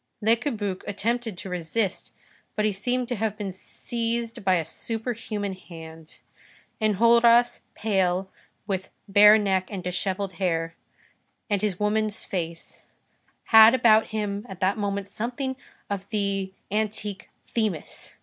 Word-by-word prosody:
Le 220 +2 +4
Cabuc 215 -7 -3
attempted 225 +1 -1
to 195 - -7
resist, 180 +3 -2 0.4
but 210 - +1
he 215 - +3
seemed 245 +5 -1
to 245 - -2
have 215 0 -1
been 205 -3 -4
seized 230 +4 -4
by 190 -2 +4
a 165 -3 0
superhuman 220 +1 -4
hand. 165 -3 -12 0.6
Enjolras, 235 +3 +5
pale, 190 -3 +1 0.4
with 190 -2 -3 0.2
bare 210 +2 +8
neck 190 -3 0
and 190 -3 -5
dishevelled 190 +2 -2
hair, 165 -2 0 0.8
and 200 -2 +2
his 205 -4 -1
woman's 215 +1 0
face, 170 -3 -4 0.7
had 220 +2 +10
about 220 -3 +5
him 205 -1 -3
at 190 -2 -8
that 190 +1 +2
moment 200 -2 -2
something 250 +5 -3 0.3
of 200 -1 -4
the 200 -3 -1 0.2
antique 210 -1 -2 0.2
Themis. 215 -9 -2
205 Hz, 130 wpm, -26 LUFS, 190-225 Hz, 0.8 s, had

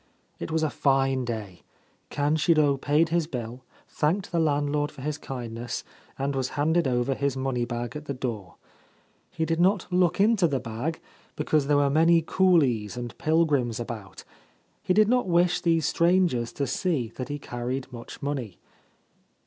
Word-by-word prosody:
It - - -5
was 160 0 0
a 155 - 0
fine 135 -2 +1
day. 110 -6 -5 0.5
Kanshiro 150 0 +2
paid 150 +3 +2
his 165 -1 +1
bill, 125 -3 -6 0.2
thanked 170 +6 -1
the 170 - +1
landlord 145 -1 +1
for 130 - -11
his 150 +1 -3
kindness, 120 -4 -5 0.3
and 140 +1 -2
was 130 -1 -1
handed 160 +2 +2
over 125 +1 +1
his 140 0 -1
money 130 -2 -1
bag 120 +3 -4
at 150 0 -6
the 140 - -3
door. 115 -7 -5 0.7
He 160 - -2
did 165 0 -1
not 190 +1 +3
look 180 -1 +2
into 205 -3 +4
the 140 -4 -1
bag, 125 +7 -4 0.4
because 150 -2 +1
there 145 -1 +3
were 140 -1 +3
many 165 +2 +4
coolies 140 - +2
and 120 -1 -6
pilgrims 150 -8 +1
about. 110 -5 -7 0.6
He 185 - 0
did 215 0 +5
not 250 -1 +2
wish 175 0 +2
these 165 -3 +2
strangers 170 -10 +2
to 140 - -1
see 135 -2 -1
that 130 -1 -5
he 145 - -3
carried 125 -1 -5
much 120 +2 -9
money. 130 -10 -3
145 Hz, 165 wpm, -26 LUFS, 125-165 Hz, 0.7 s, did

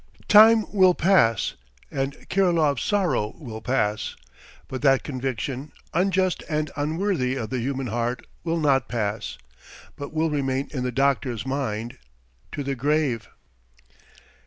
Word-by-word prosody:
Time 220 +1 +7
will 185 -3 +5
pass 160 - +3 0.4
and 135 0 -4
Kirilov's 170 -7 +2
sorrow 165 - 0
will 115 -7 -8
pass, 110 -4 -1 0.5
but 130 - -5
that 135 -2 +4
conviction, 130 +1 -4 0.2
unjust 185 0 +1
and 155 -1 -1
unworthy 155 -3 0
of 110 -5 -4
the 130 - -1
human 135 +2 -2
heart, 120 +2 -2 0.2
will 165 0 -1
not 135 -4 +2
pass, 110 -2 -3 0.6
but 145 - -7
will 160 0 0
remain 135 -2 -1
in 130 - -2
the 125 - -1
doctor's 135 -2 0
mind 120 -4 -3 0.5
to 145 - -4
the 140 0 -2
grave. 135 -3 0
135 Hz, 130 wpm, -24 LUFS, 125-160 Hz, 0.6 s, Time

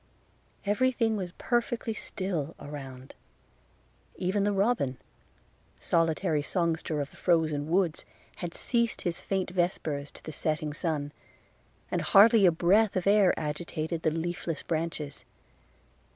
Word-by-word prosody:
Every 235 +6 +2
thing 230 -3 +1
was 185 -4 -4
perfectly 240 -1 -1
still 180 -7 -3
around; 135 -3 -9 1.0
even 195 +2 0
the 205 - +2
robin, 195 - +1 0.8
solitary 165 -1 +1
songster 160 -2 -1
of 140 - -5
the - - -17
frozen 155 -4 +1
woods, 175 -2 +1 0.3
had 175 -1 -5
ceased 235 -2 0
his 170 -1 -1
faint 190 -2 -2
vespers 160 -5 -1
to - - -14
the 155 - -6
setting 155 0 0
sun, 150 -3 -2 0.8
and - - 0
hardly 210 -1 +6
a - - +6
breath 195 +6 +3
of 185 - -1
air 200 -2 +5
agitated 160 +1 -3
the 160 - +2
leafless 165 0 -3
branches. 160 -3 -3
170 Hz, 125 wpm, -29 LUFS, 155-195 Hz, 1.0 s, hardly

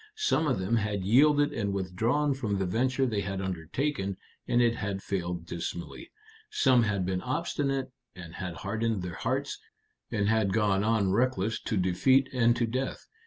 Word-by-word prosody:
Some 420 - +1
of 130 - +1
them 95 +5 0
had 105 -3 -1
yielded 145 +6 +4
and 100 -5 -2
withdrawn 110 +10 0
from 110 -7 -2
the 95 - 0
venture 130 +8 +1
they 110 -5 -1
had 95 -1 -3
undertaken, 95 - -2 0.3
and 120 - +2
it 120 -1 +3
had 100 -1 -3
failed 90 -3 -3
dismally. 85 - -6 0.4
Some 130 - +4
had 105 -4 0
been 90 0 -1
obstinate, 135 -1 -2 0.2
and 85 -3 -10
had 90 -1 -5
hardened 110 0 -2
their 90 -2 -5
hearts, - - -2 0.5
and 100 -1 0
had 110 -3 +2
gone 105 -3 +2
on 105 -3 +2
reckless 110 -1 +1
to 110 - -2
defeat 115 +9 +3
and 120 -2 +3
to 120 - +1
death. 130 +4 -3
110 Hz, 165 wpm, -29 LUFS, 95-130 Hz, 0.5 s, yielded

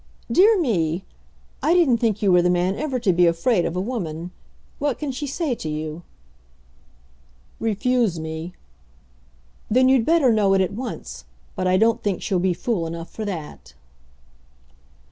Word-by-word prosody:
"Dear 405 - +5
me! 180 - 0 0.6
I 315 +5 +3
didn't 280 -10 +4
think 215 -3 0
you 195 - +4
were 180 -1 +5
the 180 - +2
man 180 +2 +1
ever 280 -1 -2
to 205 -6 +2
be 175 0 +4
afraid 170 +3 +1
of 165 - -3
a - - -1
woman. 180 -6 -4 0.5
What 285 -3 -1
can 295 -3 -3
she 275 +3 -5
say 290 0 -2
to 160 -9 -5
you?" 155 +1 -5 1.6
"Refuse 225 -3 0
me." 160 +2 -6 1.2
"Then 255 +3 +4
you'd 260 -3 +4
better 315 -7 +4
know 200 -3 +3
it 190 - +3
at 185 +1 -1
once. 220 - -7 0.3
But 185 - -1
I 185 0 +3
don't 230 +3 +2
think 200 -4 -1
she'll 190 -4 0
be 180 0 +1
fool 180 -5 -2
enough 165 0 -7
for 220 - -5
that." 160 - -7
200 Hz, 165 wpm, -22 LUFS, 175-255 Hz, 1.6 s, Dear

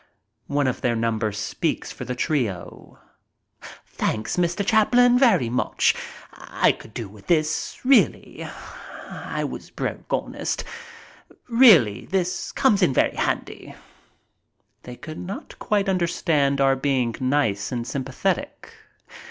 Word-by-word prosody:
One 145 0 0
of 130 - -1
their 120 -1 +1
number 110 -1 -1
speaks 105 +1 -3
for - - -8
the 125 - -4
trio. 120 - -3 0.9
"Thanks, 110 0 -2
Mr. 175 +3 0
Chaplin, 245 +3 +4
very 210 - +4
much. 125 +2 +1 0.4
I - - +1
could 115 - -12
do 115 -4 -4
with 100 +1 -16
this, 155 -2 0
really. 270 0 +2 0.6
I - - -4
was - - -6
broke, - - -5
honest. - - -2 0.8
Really, 215 - +6
this 185 -2 -2
comes 215 -7 +2
in 155 -8 +3
very - - +2
handy." - - -3 1.1
They 125 - -9
could 155 +4 -9
not 190 +3 -8
quite 205 -1 0
understand 165 -6 +1
our 135 -1 +4
being 130 -3 0
nice 130 -7 0
and 120 -2 -3
sympathetic. 130 +2 -3
140 Hz, 120 wpm, -23 LUFS, 120-190 Hz, 1.1 s, Really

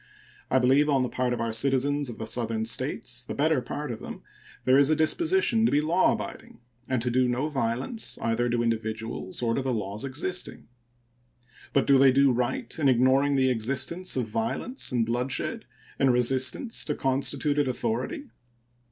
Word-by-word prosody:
I 130 - +3
believe 135 +4 +3
on 135 -3 +3
the 125 - -2
part 125 -1 -1
of 120 - -2
our 115 -1 -2
citizens 140 +3 +1
of 120 - -8
the 110 - -5
Southern 110 -1 -2
States 125 0 -2
the - - -6
better 150 -1 +2
part 145 +3 -5
of 110 - -6
them - - -9 0.4
there 130 +2 +5
is 140 0 +4
a 155 - +4
disposition 240 - +2
to 230 - +3
be 145 - +3
law 165 +5 +3
abiding, - - -7 0.3
and 130 -3 0
to 125 - -1
do 130 +1 +2
no 125 +4 -1
violence 135 - -2
either 115 +1 0
to 120 0 0
individuals 110 -2 -3
or 115 -1 +1
to 135 - 0
the 130 0 -2
laws 105 -2 -4
existing. 140 +7 -4 1.0
But 140 - +2
do 140 -1 +5
they 135 -1 +6
do 135 +1 +4
right 125 +1 -2
in 140 -3 +3
ignoring 130 +3 +3
the 130 -1 +3
existence 140 +10 0
of 125 -3 0
violence 115 - -2
and 120 -3 +1
bloodshed 125 +3 -2 0.3
in 135 - +4
resistance 130 - +1
to 150 - -2
constituted 140 +2 0
authority? 125 - -3
130 Hz, 180 wpm, -26 LUFS, 120-145 Hz, 1.0 s, they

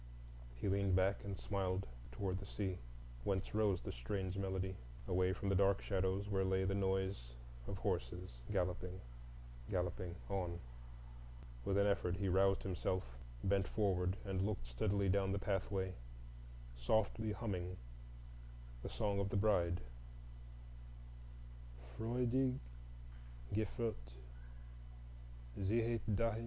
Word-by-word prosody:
He - - -2
leaned 100 -1 +3
back 95 +2 +4
and 100 -1 -3
smiled 95 -1 0 0.3
toward 95 +8 -1
the 100 - -7
sea, 95 -4 -2 0.4
whence 95 +4 0
rose 105 -4 +3
the - - -4
strange 95 +10 -2
melody, 95 -1 -1 0.3
away 90 +1 +3
from 100 - -2
the 100 - +3
dark 100 0 +5
shadows 95 0 0
where 95 -2 +2
lay 95 0 +2
the 95 +1 +1
noise 95 -10 0 0.3
of 100 - -3
horses 90 -2 -1 0.2
galloping, 90 -1 0 0.7
galloping 90 -1 -1
on. 90 -3 -1 1.1
With 100 - +2
an 100 - +5
effort 100 -3 +2
he 100 -1 +1
roused 95 +1 +4
himself, 95 0 0 0.4
bent 95 0 +3
forward, 95 -3 +2
and 95 -1 0
looked 100 - 0
steadily 100 - +1
down 95 0 +3
the - - +1
pathway, 95 -1 0 0.8
softly 110 - +2
humming 90 -4 -2 1.0
the - - -4
"Song 100 -1 0
of 100 0 +1
the 100 - +1
Bride,"— 90 -4 +3 2.1
"Freudig 125 +3 +2 1.0
geführt, 110 - -1 1.5
ziehet 115 +3 +2
dahin." 115 +1 +2
95 Hz, 120 wpm, -39 LUFS, 95-100 Hz, 2.1 s, dark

